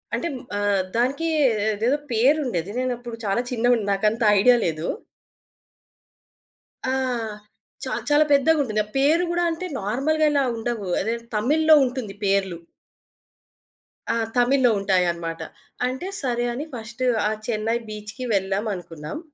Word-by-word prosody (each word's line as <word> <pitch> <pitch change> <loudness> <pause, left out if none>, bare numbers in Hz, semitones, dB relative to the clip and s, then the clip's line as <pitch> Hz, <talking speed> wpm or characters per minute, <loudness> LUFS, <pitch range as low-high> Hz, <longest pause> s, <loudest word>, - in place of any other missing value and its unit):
అంటే 340 - -2 0.3
ఆహ్, 205 -2 +2
దానికి 275 +7 +1 0.5
అదేదో 235 +7 +1
పేరుండేది 235 - +1
నేను 255 -1 0
అప్పుడు 240 -1 -8
చాలా 200 +4 +1
చిన్నగున్న 240 -2 +2
నాకంత 215 +4 0 0.2
ఐడియా 245 +4 +6
లేదు. 160 0 -2 2.0
ఆ! - - +1 0.9
చా - - -4 0.2
చాలా 295 +1 +5
పెద్దగుంటుంది. 280 -6 +3
ఆ - - -20
పేరు 310 +6 +3
గూడా 345 0 +1
అంటే 350 +3 -4
నార్మల్‌గా 275 +10 +1
ఇలా 280 -2 +2
ఉండవు. 225 -3 -3
అదేదో 230 +3 -2
తమిళ్‌లో 310 +8 +4
ఉంటుంది 245 -6 -4
పేర్లు. 195 -3 +1 1.6
ఆ! - - -1 0.2
తమిళ్లో 250 0 +4
ఉంటాయనమాట. 170 -4 0 0.5
అంటే 260 +9 -4
సరే 240 -2 -1
అని 280 +6 -4
ఫస్ట్ 235 +2 -6 0.3
ఆ - - -1 0.2
చెన్నై 225 0 0
బీచ్‌కి 215 +4 -7
వెళ్ళామనుకున్నాం. 190 - -3
235 Hz, 120 wpm, -23 LUFS, 200-270 Hz, 2.0 s, ఐడియా